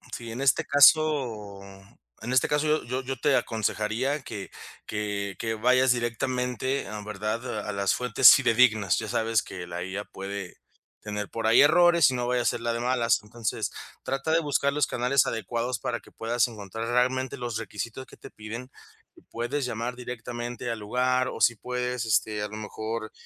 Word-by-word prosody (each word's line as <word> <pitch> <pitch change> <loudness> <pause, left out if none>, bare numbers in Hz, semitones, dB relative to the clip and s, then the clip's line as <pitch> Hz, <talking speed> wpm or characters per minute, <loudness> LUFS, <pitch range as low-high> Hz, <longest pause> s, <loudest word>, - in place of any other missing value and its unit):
Sí, 115 -1 -7
en 120 - -5
este 135 -3 +3
caso 140 -9 +4 0.6
en 120 +3 -3
este 130 - +4
caso 150 +1 +1
yo 155 +1 +1
yo 130 +2 -3
yo 135 +1 -3
te 145 -2 +2
aconsejaría 115 +6 -1
que 100 -3 -7 0.4
que 100 -2 -3
que 110 -1 -2
vayas 125 +3 +3
directamente, 125 +2 -1
em, 105 +1 -7
¿verdad?, 105 +2 -4
a 105 - -2
las 100 -1 +1
fuentes 125 -3 +7
fidedignas. 115 -7 +3
Ya 110 - -3
sabes 110 +1 +1
que 90 -1 -8
la 85 0 -5
IA 95 +3 -4
puede 95 -1 -7 0.5
tener 105 -1 -5
por 115 -1 -4
ahí 115 - +6
errores 170 0 +6
y 130 - -2
no 120 0 -2
vaya 125 0 +1
a - - -3
ser - - 0
la 115 0 -1
de 115 - -2
malas. 120 -1 +2
Entonces, 115 +1 -3 0.3
trata 135 +4 -2
de 165 - +4
buscar 140 -2 0
los 150 -3 +1
canales 125 +2 +2
adecuados 115 +1 -2
para 120 0 -3
que - - -19
puedas 120 +2 0
encontrar 110 0 -6
realmente 130 +2 0
los 120 -2 -3
requisitos 115 +4 -6
que - - -16
te - - -12
piden. 115 +4 -8 0.6
Puedes 120 +4 -2
llamar 120 +1 -3
directamente 120 0 -6
al 115 - -4
lugar 125 +4 +1
o - - -7
si 120 - +5
puedes, 125 +1 -3
este, 110 -1 +1
a - - -2
lo 110 - -7
mejor 110 +1 -5
120 Hz, 180 wpm, -26 LUFS, 110-130 Hz, 0.6 s, fuentes